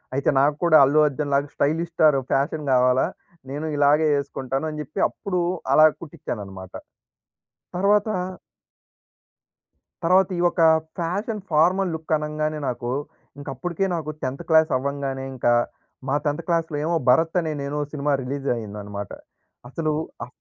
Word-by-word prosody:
అయితే 140 - +1
నాకు 145 +2 +3
కూడా 160 -2 +7
అల్లు 150 +3 +3
అర్జున్‌లాగా 140 0 -1
స్టైలిష్ 165 +4 0
స్టార్ 155 -4 +5 0.2
ఫ్యాషన్ 150 +2 0
కావాలా. 125 +1 +3 0.4
నేను 145 +3 -4
ఇలాగే 145 +2 +4
యేసుకుంటాను 135 0 -3
అని 150 0 -6
జెప్పి, 155 +6 -7
అప్పుడూ 185 -4 -3 0.3
అలా 155 - +8 0.2
కుట్టించాను 150 -9 -6
అనమాట. 95 -1 -11 1.0
తర్వాత 205 +3 +3 1.9
తర్వాత 185 +2 +4
ఈ - - -2
యొక్క 175 -1 +1 0.4
ఫ్యాషన్ 200 +6 -2
ఫార్మల్‌ 180 +4 +3
లుక్ 160 0 -4
అనంగానే, 155 0 -3
నాకు 120 0 -3 0.5
ఇంక 145 - -10
అప్పడుకే 175 +8 -2
నాకు 155 -2 -4
10థ్ 130 +1 -3
క్లాస్ 160 0 +5
అవ్వంగానే 135 0 -3
ఇంకా, 120 -1 +2 0.6
మా 140 - +2
10థ్ 150 +3 -1
క్లాస్‌లో 165 -3 0
ఏమో 170 - +1
'భరత్ 160 +7 +3
అనే 160 -2 -3
నేను' 145 +1 -2
సినిమా 145 0 0
రిలీజ్ 140 +2 -4
అయిందన్నమాట. 105 -2 -7 0.6
అసలు 155 +3 -1 0.3
ఆ - - -16
150 Hz, 135 wpm, -23 LUFS, 135-165 Hz, 1.9 s, అలా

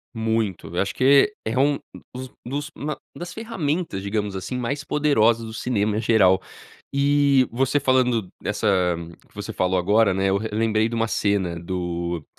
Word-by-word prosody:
Muito. 110 -3 -1
Eu - - +2
acho 100 - -2
que 140 +10 +5
é 110 - -1
é 125 - 0
um 140 +1 +3 0.4
dos 130 0 -7
dos 140 +4 -4
ma 150 0 -4 0.2
das 175 0 -7
ferramentas, 175 - -3
digamos 100 0 -2
assim, 95 +7 -4
mais 140 +4 -2
poderosas 115 -7 +2
do 110 - -8
cinema, 110 -3 0
em - - 0
geral. 100 -5 +4 0.5
E, 140 -1 +3
você 135 +4 +1
falando 125 -6 +2
dessa 105 +1 -2 0.6
que - - -29
você - - -6
falou 95 0 +1
agora, 105 +4 +3
né, 95 +1 +1
eu 95 - +2
re 110 +2 -4
lembrei 110 0 +1
de 115 - -5
uma 115 0 0
cena 95 -6 0
do 85 -2 -3
115 Hz, 175 wpm, -23 LUFS, 100-140 Hz, 0.6 s, que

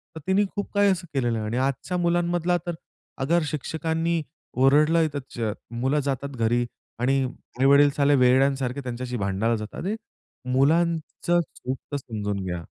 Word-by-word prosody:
तर 160 - -6
तिने 195 +2 +3
खूप 205 - -3
काही 205 0 +4
असं 180 -2 -3
केलेलं 120 -4 0
आहे. 110 - -3
आणि 115 +3 -2
आजच्या 135 +7 -1
मुलांमधला 175 0 +1
तर 175 - -2 0.5
अगर, 170 +6 +2
शिक्षकांनी 160 +3 -1 0.3
ओरडलय 150 +5 +4
त - - -2 0.2
च 110 -3 -1 0.2
मुलं 130 +5 0
जातात 140 0 -2
घरी 120 +1 +1 0.3
आणि 135 +2 +2 0.4
आई-वडील 140 +2 +6
साले 145 0 +4
वेड्यासारखे 130 +1 +3
त्यांच्याशी 125 0 -4
भांडायला 100 +3 0
जातात. 105 -1 -6
अरे 205 +4 -1 0.6
मुलांचं 165 +4 +2 0.2
चूक 130 +1 -4
तर 145 - 0
समजून 105 -6 -4
घ्या. 90 -2 -4
140 Hz, 150 wpm, -25 LUFS, 125-165 Hz, 0.6 s, आई-वडील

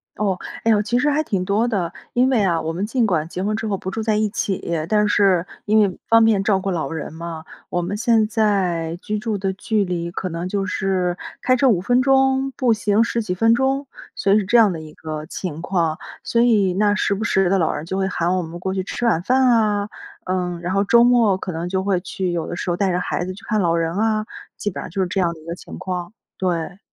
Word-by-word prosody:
哦， 200 -3 0 0.3
哎 225 - +3
哟， 210 -1 +4
其 240 +3 0
实 295 +3 +2
还 305 +2 +2
挺 190 -9 -2
多 215 +5 +1
的。 185 -7 -1 0.2
因 250 +1 +3
为 230 -6 +2
啊， 170 -3 +2
我 160 +1 -3
们 185 +4 -3
尽 235 0 +1
管 160 -6 0
结 180 +2 -5
婚 215 +1 0
之 220 0 -3
后 200 -2 -1
不 190 - -5
住 225 - -3
在 215 -1 +1
一 215 0 +2
起， 195 -1 -2 0.3
但 210 -1 +3
是 190 -4 +3 0.2
因 215 +1 +4
为 195 -4 +1
方 230 0 +6
便 205 -3 +3
照 195 -2 +2
顾 195 0 -2
老 170 -3 -2
人 160 -1 -5
嘛， 165 -1 -7 0.2
我 175 - -1
们 195 +4 -3
现 230 -1 +3
在 185 -7 0
居 210 0 -3
住 215 -2 -2
的 190 0 -2
距 205 +1 0
离 170 -1 -3
可 185 +1 -4
能 170 +2 -4
就 195 -1 -1
是 185 -1 0 0.3
开 255 0 +4
车 260 +1 +3
5 180 -6 +2
分 245 +4 +2
钟、 270 0 +3
步 245 -4 +3
行 210 +1 +2
10 235 0 -1
几 180 -4 -3
分 225 +4 +4
钟， 270 +3 +1 0.3
所 195 - +2
以 215 - +5
是 200 - -3
这 235 +5 +4
样 210 -5 +5
的 160 - -5
一 155 -1 -10
个 155 -1 -6
情 165 -4 -5
况。 170 -3 0 0.2
所 235 - +1
以 205 -6 +3
那 205 +1 +2
时 200 - +1
不 210 +3 -3
时 195 -4 +2
地 195 -1 +2
老 160 - +2
人 150 +2 -5
就 190 - -4
会 190 - +1
喊 180 -1 0
我 - - 0
们 170 +1 -7
过 190 +1 -2
去 190 -1 -2
吃 240 +5 -4
晚 190 -8 +2
饭 255 +5 +3
啊， 210 -3 +2 0.4
嗯， 180 -2 -2
然 180 +2 -2
后 200 +1 +2
周 235 +4 +5
末 235 -6 +4
可 185 - -5
能 170 +2 -4
就 190 0 -1
会 195 -3 +1
去 180 0 -3
有 170 -2 -2
的 - - -4
时 175 - -2
候 - - 0
带 195 -2 +1
着 180 - 0
孩 175 - -2
子 185 +1 -4
去 200 - -14
看 215 -1 0
老 170 -1 +2
人 165 +1 -1
啊， 215 0 +1 0.3
基 205 - -2
本 - - -6
上 - - -7
就 190 - -5
是 185 - +2
这 190 0 -1
样 170 -1 +1
的 - - -14
一 - - -17
个 170 - -4
情 - - -10
况， 180 0 -4 0.3
对。 180 +1 -2
195 Hz, 275 characters per minute, -21 LUFS, 175-220 Hz, 0.4 s, 方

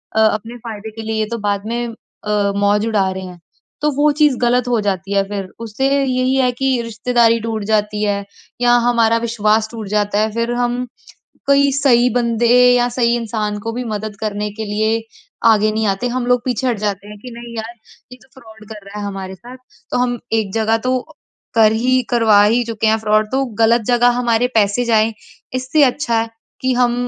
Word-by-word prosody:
अ, - - +2
अपने 220 +2 0
फ़ायदे 220 -2 -8
के 225 +1 -8
लिए 220 0 -2
ये 215 - +1
तो 235 - -2
बाद 200 0 -1
में 240 +1 -2
अ, 210 -2 -3
मौज 205 +1 +2
उड़ा 200 -4 +1
रहे 190 0 -6
हैं। 180 -1 -10 0.4
तो 300 - +2
वो 295 +1 +3
चीज़ 295 -5 +4
ग़लत 245 +1 +2
हो 240 -2 +1
जाती 195 -1 -2
है। 195 0 +3
फिर 200 -2 -4
उससे 230 +4 -2 0.2
यही 255 0 +1
है 255 -2 +2
कि 260 0 0
रिश्तेदारी 230 +1 +1
टूट 220 -1 -3
जाती 210 0 0
है 200 -1 -1 0.4
या 240 0 +4
हमारा 230 -1 +3
विश्वास 220 -1 +1
टूट 225 -3 -7
जाता 205 0 0
है। 215 0 +1
फिर 230 +1 -1
हम 245 +1 -1 0.6
कई 280 0 +4
सही 255 -3 +3
बंदे 235 -1 +1 0.3
या 245 0 +2
सही 235 -1 +1
इंसान 215 -2 -3
को 225 +2 -4
भी 250 +2 -4
मदद 215 -2 -5
करने 210 -1 -3
के 220 +1 -5
लिए 215 +2 0 0.5
आगे 215 -1 +3
नहीं 220 0 -1
आते। 195 +6 -1
हम 245 0 -2
लोग 245 -1 +2
पीछे 255 +1 -1
हट 235 - -1
जाते 205 -1 -3
हैं 210 0 -10
कि 250 - -8
नहीं 235 0 -9
यार 225 +2 -5 0.4
ये 250 - -11
तो - - -23
फ्रॉड 220 -2 -15
कर 210 -2 -10
रहा 205 +1 -8
है 205 - -4
हमारे 195 -1 -6
साथ। 245 +7 -12 0.3
तो - - 0
हम 245 -1 0
एक 220 -3 0
जगह 225 0 +2
तो 255 0 +2 0.6
कर 220 -1 +5
ही 255 +3 +2
करवा 220 -4 +5
ही 230 +4 +3
चुके 225 -1 -2
हैं 220 +1 +3
फ्रॉड 215 0 +2
तो 270 +1 +1 0.2
ग़लत 230 +1 +4
जगह 245 0 +4
हमारे 240 0 +2
पैसे 210 +3 +2
जाएँ, 225 -1 +2 0.4
इससे 255 +4 +1
अच्छा 245 -3 +1
है 225 - -3 0.3
कि 260 - +1
हम 245 -1 +2
225 Hz, 205 wpm, -18 LUFS, 210-245 Hz, 0.6 s, कर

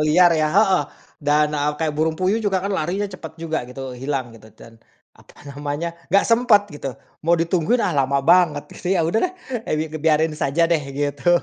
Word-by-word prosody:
liar 170 +3 +5
ya 155 -1 +1
heeh. 190 +1 +3 0.4
Dan, 150 0 +2
eee, 150 0 0
kayak 155 -1 -1
burung 160 +1 0
puyuh 190 +5 +1
juga 200 -3 0
kan 200 - -1
larinya 190 +3 -1
cepat 160 -4 -10
juga, 160 -5 -3
gitu, 130 +1 -7
hilang, 130 -1 -4
gitu. 110 -1 -15
Dan, 115 0 -16 0.3
apa - - -21 0.2
namanya, 145 +4 -4 0.2
nggak 200 +3 +4
sempat, 230 -3 +4
gitu. 135 -4 -6 0.3
Mau 170 +1 +4
ditungguin, 170 +8 +1
"Ah, 185 - 0
lama 140 0 +2
banget," 170 -3 +3
gitu. 180 - -3
Ya 170 - +2
udah 175 +8 +1
deh! - - -17 0.4
Eh - - +1
bi 155 - -1
ngebiarin 155 0 +1
saja 150 +2 +1
deh, 165 -2 +1
gitu. 145 +3 -2
160 Hz, 195 wpm, -21 LUFS, 145-180 Hz, 0.4 s, liar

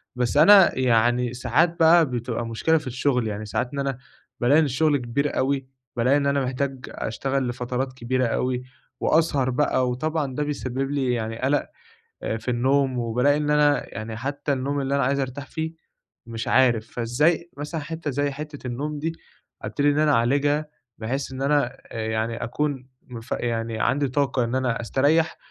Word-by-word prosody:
بس 125 +3 0
أنا 195 +1 +7
يعني 120 0 +2
ساعات 130 +8 +1
بقى 165 +1 +6
بتبقى 120 -2 -3
مشكلة 115 +8 +1
في 150 -4 -6
الشغل، 125 -1 0
يعني 105 0 -4
ساعات 120 +5 -2
إن 140 - -3
أنا 135 -2 -2 0.4
بالاقي 135 +6 +4
إن 160 - +3
الشغل 145 +2 +2
كبير 140 +3 -2
اوي، 135 0 0 0.3
بالاقي 125 +4 +3
إن 140 - 0
أنا 140 -1 +1
محتاج 130 0 -3
أشتغل 135 +4 -2
لفترات 125 +2 -3
كبيرة 130 +1 -1
اوي، 125 +2 -1 0.4
وأسهر 145 -5 +2
بقى 130 -1 +1
وطبعًا 145 +1 -2
ده 150 - 0
بيسبب 135 -2 -3
لي 135 -3 0
يعني 115 -1 -3
قلق 140 +3 +1 0.7
في 120 +3 -3
النوم 130 +2 +1
وبالاقي 125 +5 +2
إن 150 0 -1
أنا 150 -1 +2
يعني 110 0 -5
حتى 140 +4 -2
النوم 140 +2 -1
اللي 135 +1 -1
أنا 140 - +2
عايز 140 +2 +1
أرتاح 135 +1 -4
فيه 160 +2 -4 0.5
مش 115 -1 -5
عارف، 120 -4 +3
فإزاي 150 +9 +1
مثلًا 150 +2 -4
حتّة 160 0 -4
زي 145 +2 0
حتّة 145 -1 -7
النوم 145 +5 -4
دي 165 +2 -1 0.5
ابتدي 145 0 +1
إن 145 +1 +1
أنا 155 -1 +4
اعالجها 145 +5 +2 0.3
بحيث 130 +5 -3
إن 130 0 -6
أنا 140 -2 +1
آآ، 110 -1 -3
يعني 110 +1 -2
أكون 135 0 -3
مف 120 -1 -11
يعني 115 -1 -2
عندي 140 +5 +1
طاقة 135 -1 0
إن 120 +2 -2
أنا 125 -3 0
أستريَّح 145 +7 +2
130 Hz, 170 wpm, -24 LUFS, 120-145 Hz, 0.7 s, أنا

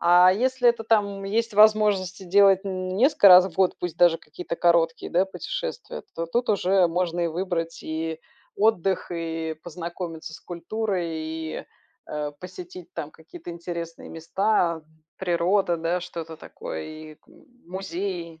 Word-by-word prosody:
А 180 +1 +6
если 250 +3 +2
это 235 -1 +1
там 200 -3 +1
есть 225 +2 -1
возможность 205 -3 +4
делать 195 0 +5
н 185 -1 -3
несколько 240 -4 +6
раз 180 0 +9
в 170 - -9
год, 190 0 +2
пусть 175 -2 -4
даже 175 -2 +5
какие-то 170 +2 -7
короткие, 170 -1 +2
да, 180 +2 +3
путешествия, - - -5
то 165 - -3
тут 240 +8 -1
уже 190 -2 +3
можно 175 0 -1
и 170 - +2
выбрать 165 -1 -3
и 160 0 -4 0.4
отдых, 195 -4 +1
и 165 -1 -3
познакомиться 170 -1 -6
с - - -11
культурой, 185 +1 -3
и, 160 0 -5 0.4
э, 150 -1 -4
посетить 180 -1 -10
там 155 -3 -5
какие-то 165 +1 -11
интересные 170 -1 -6
места, 170 0 0 0.3
природа, 175 0 +1
да, 165 +2 -1
что-то 165 -2 -7
такое, 80 - -7
и 155 0 -9
к - - -38 0.4
музеи. 175 -2 -5
175 Hz, 145 wpm, -25 LUFS, 165-195 Hz, 0.4 s, раз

